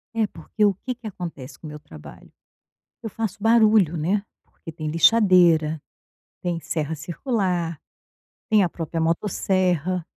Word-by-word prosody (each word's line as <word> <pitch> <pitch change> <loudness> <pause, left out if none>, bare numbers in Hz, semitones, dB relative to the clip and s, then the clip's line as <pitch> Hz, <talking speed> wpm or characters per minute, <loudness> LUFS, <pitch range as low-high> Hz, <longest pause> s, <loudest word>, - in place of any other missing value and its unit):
É, 225 -1 +2
porque 210 +1 -2
o 205 - +3
que 250 +7 -6
que 235 -2 -10
acontece 160 -9 -8
com 160 - -9
o - - -7
meu 150 0 -9
trabalho, 80 - -14 0.7
eu 225 - -4
faço 215 -2 -4
barulho, 215 -6 +4
né, 190 +7 0 0.2
porque 165 - -12
tem 155 -1 -6
lixadeira, 165 -4 +4 0.6
tem 175 -2 -2
serra 160 -1 -3
circular, 175 - -2 0.7
tem 215 -2 +5
a 180 - +2
própria 165 0 -5
motosserra 180 0 0
175 Hz, 140 wpm, -23 LUFS, 160-210 Hz, 0.7 s, tem